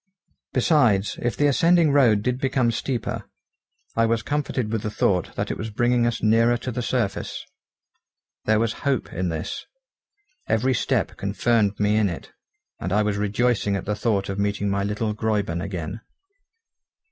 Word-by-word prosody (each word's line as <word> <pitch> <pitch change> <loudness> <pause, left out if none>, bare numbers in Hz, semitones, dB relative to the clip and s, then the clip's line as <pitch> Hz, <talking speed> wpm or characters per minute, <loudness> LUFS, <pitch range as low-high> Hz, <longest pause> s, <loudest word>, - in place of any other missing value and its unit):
Besides, 110 - +2
if 120 - -1
the 145 - +3
ascending 165 +2 +4
road 120 -8 +4
did 125 +1 -1
become 130 -3 +1
steeper, 120 +1 -3 0.7
I 115 0 +3
was 115 0 0
comforted 135 -6 -2
with 110 -2 -1
the 110 - -3
thought 90 -4 0
that - - -2
it - - -5
was 110 - -4
bringing 120 +2 +2
us 115 -1 -2
nearer 115 +2 +4
to 125 +2 -5
the 125 - -3
surface. 115 -5 -2 1.0
There 110 0 +3
was 115 -1 +1
hope 140 -4 -1
in 90 0 -1
this. 80 +4 -4 0.9
Every 130 +4 +2
step - - 0
confirmed 110 -4 +1
me 105 +1 +2
in 105 -2 +3
it, 85 - -7 0.5
and 90 - -4
I 105 +2 +3
was 105 -1 0
rejoicing 105 0 +1
at 95 - -4
the 105 - -1
thought 105 -3 0
of 95 0 -4
meeting 100 0 0
my 100 0 0
little 105 +2 -1
Gräuben 105 -6 -1
again. 95 +2 -5
110 Hz, 165 wpm, -24 LUFS, 100-120 Hz, 1.0 s, ascending